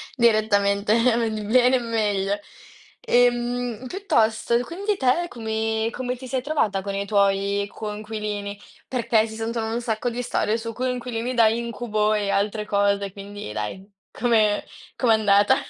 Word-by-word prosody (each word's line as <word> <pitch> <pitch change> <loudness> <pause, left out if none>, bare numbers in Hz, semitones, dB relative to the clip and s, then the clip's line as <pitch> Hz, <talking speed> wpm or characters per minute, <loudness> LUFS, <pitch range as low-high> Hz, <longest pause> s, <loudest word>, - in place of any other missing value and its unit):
Direttamente, 210 -3 +3
eh 230 -1 +3
di 215 -1 -3
bene, 250 +4 +4
in 235 -2 -5
meglio. 205 -2 0 0.6
Ehm 245 0 +1
piuttosto, 235 - +1
quindi 395 - -2
te 275 +7 +2
come 220 -1 -1
come 250 0 -3
ti 260 0 -9
sei 260 0 -1
trovata 220 -10 0
con 200 0 -4
i 200 0 -2
tuoi 200 0 +1
coinquilini? 210 -1 -5 0.3
Perché 230 -3 +1
si 220 - -9
sentono 225 0 -3
un 240 - -1
sacco 230 +1 -1
di 240 +1 -4
storie 230 -2 0
su 230 0 -5
coinquilini 250 -1 -2
da 230 -2 +5
incubo 225 -2 0
e 205 -2 0
altre 210 +2 0
cose, 200 -1 +1
quindi 200 - -8
dai, 185 - -5 0.2
come 220 -3 +2 0.3
com'è 235 -3 +3
andata? 205 -2 +4
220 Hz, 145 wpm, -24 LUFS, 205-240 Hz, 0.6 s, da